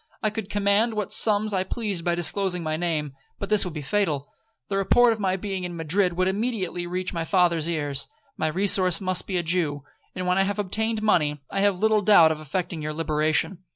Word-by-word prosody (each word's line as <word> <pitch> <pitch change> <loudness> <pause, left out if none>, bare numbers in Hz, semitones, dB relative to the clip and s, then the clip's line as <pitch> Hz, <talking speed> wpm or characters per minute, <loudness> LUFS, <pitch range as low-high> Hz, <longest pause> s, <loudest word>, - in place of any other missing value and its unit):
I 215 - +1
could 215 -2 -6
command 205 +3 +1
what 210 -2 -3
sums 215 -1 +3
I 185 -1 +1
pleased 200 -3 -4
by 175 0 0
disclosing 180 +1 0
my 155 -1 -2
name, 155 -4 -2 0.2
but 200 - -6
this 210 - +5
would 180 -4 -6
be 150 - -5
fatal. 150 -4 -1 0.4
The 195 - -2
report 230 +5 +4
of 220 - -8
my 190 -2 0
being 190 -1 -4
in 175 -1 -5
Madrid 175 +3 +1
would 185 +2 0
immediately 190 -4 -2
reach 180 +1 -3
my 165 -1 -2
father's 170 -3 +1
ears. 145 -4 -2 0.3
My 155 - -1
resource 185 +1 +2
must 185 -2 -1
be 185 - -1
a 175 - -1
Jew; 160 -4 -1 0.3
and 185 - -4
when 180 +1 +2
I - - +4
have 205 +1 -2
obtained 215 +2 -2
money, 150 -9 +1
I - - -2
have 200 -1 +2
little 215 +2 +2
doubt 185 -6 +6
of 155 - -3
effecting 160 +2 -4
your 155 0 -4
liberation. 155 +3 0
185 Hz, 215 wpm, -24 LUFS, 165-205 Hz, 0.4 s, doubt